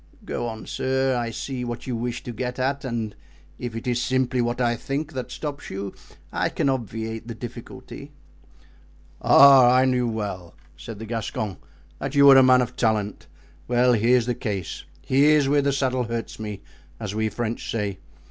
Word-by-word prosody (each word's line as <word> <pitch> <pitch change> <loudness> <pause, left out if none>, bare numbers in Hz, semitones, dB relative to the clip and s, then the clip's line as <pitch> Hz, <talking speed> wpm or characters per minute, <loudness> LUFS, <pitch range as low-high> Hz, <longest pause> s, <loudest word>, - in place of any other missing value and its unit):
"Go 120 - -3
on, 110 -1 -7
sir, 130 0 0
I 120 -1 -1
see 125 +3 -5
what 120 -1 -5
you 125 - -3
wish 120 +1 -3
to 120 - -5
get 125 +2 -4
at; 135 +2 -1
and 115 -5 -3 0.4
if 120 -2 -5
it 115 - -6
is 125 -1 0
simply 130 0 +1
what 120 +1 -1
I 120 -1 +2
think 145 +6 -4
that 130 -1 -5
stops 145 +2 -6
you, 100 0 -5 0.4
I - - 0
can 140 - 0
obviate 115 -2 -3
the 115 - -6
difficulty." 120 +1 -9 1.1
"Ah, 135 -3 +8
I 130 +1 +5
knew 125 -2 +1
well," 100 -6 -4 0.2
said 105 +7 -9
the 110 - -7
Gascon, 110 -3 -3 0.4
"that 135 +1 -4
you 140 0 +6
were 135 -1 +9
a - - +9
man 130 -1 +6
of 125 +1 -7
talent. 110 -4 -1 0.4
Well, 125 +1 +3
here's 120 +2 +3
the 125 - 0
case, 100 -7 -4 0.2
here's 145 +2 +4
where 145 +1 +3
the 140 0 +1
saddle 130 -2 0
hurts 115 -1 -5
me, 105 -2 -6 0.4
as 105 -3 -4
we 110 0 0
French 115 0 -4
say. 100 -4 -2
120 Hz, 180 wpm, -24 LUFS, 110-130 Hz, 1.1 s, were